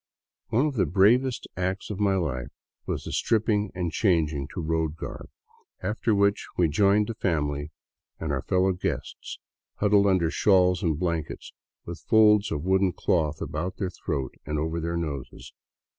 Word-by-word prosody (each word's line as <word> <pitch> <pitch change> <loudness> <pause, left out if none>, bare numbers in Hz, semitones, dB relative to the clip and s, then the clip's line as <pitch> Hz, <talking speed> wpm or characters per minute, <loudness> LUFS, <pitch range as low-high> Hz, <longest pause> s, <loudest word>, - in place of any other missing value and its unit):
One 125 +6 +2
of 150 - -1
the 95 -5 +2
bravest 115 - +3
acts 95 +3 -2
of 100 - -5
my 100 -2 +2
life 65 -9 -2 0.4
was - - -3
the - - -6
stripping 105 -2 +1
and 90 -2 -2
changing 80 -8 +1
to - - -7
road 80 -1 -1
garb, 85 - -7 0.5
after 105 +3 0
which 100 0 +2
we 85 -3 +3
joined 100 +6 +3
the 115 - -4
family 75 -8 -1 0.5
and 80 -2 -3
our 65 -2 -1
fellow 95 +3 +2
guests, 90 - -4 0.4
huddled 100 -1 +3
under 90 -4 +2
shawls 90 -2 +3
and 80 -4 0
blankets, 85 -3 -3 0.3
with 85 -1 -7
folds 105 +4 +4
of 75 -1 -2
woolen 95 0 +2
cloth 75 -4 0
about 90 +5 -4
their 95 -3 -2
throats 70 -9 -4
and 75 +2 -3
over 80 +2 -2
their 85 +1 -2
noses. 70 -6 -6
90 Hz, 160 wpm, -26 LUFS, 80-100 Hz, 0.5 s, folds